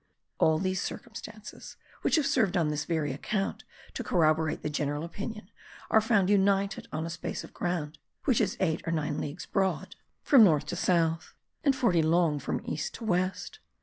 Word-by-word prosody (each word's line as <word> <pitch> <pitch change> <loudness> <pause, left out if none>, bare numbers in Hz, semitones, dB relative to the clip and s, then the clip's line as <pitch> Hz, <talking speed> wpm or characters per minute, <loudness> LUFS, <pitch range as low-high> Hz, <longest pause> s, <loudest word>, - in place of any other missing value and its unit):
All 160 0 +4
these 185 +2 -1
circumstances 220 -2 -8 0.2
(which - - +2
have 310 -3 +2
served 210 -9 +2
on 165 -3 +2
this 150 -1 -2
very 155 -5 -1
account 195 +8 -2 0.3
to - - -4
corroborate 160 -2 +2
the - - -1
general 145 +1 -2
opinion) 205 +3 -7 0.4
are 220 - +6
found 210 -4 +3
united 200 0 +2
on 155 +1 -3
a - - -4
space 170 - -5
of - - -12
ground 160 -4 -3 0.3
which 250 -5 +3
is 200 -3 0
eight 165 -4 +1
or - - 0
nine 155 -2 -1
leagues 150 +4 -5
broad 190 -1 -1 0.3
from 265 -6 +7
north 155 -8 +4
to - - -4
south, 165 -2 +1 0.3
and 275 -2 +3
forty 205 -11 +3
long 160 -1 +2
from 140 - -3
east 150 - -3
to - - -9
west. 185 - -1
180 Hz, 180 wpm, -29 LUFS, 155-205 Hz, 0.4 s, from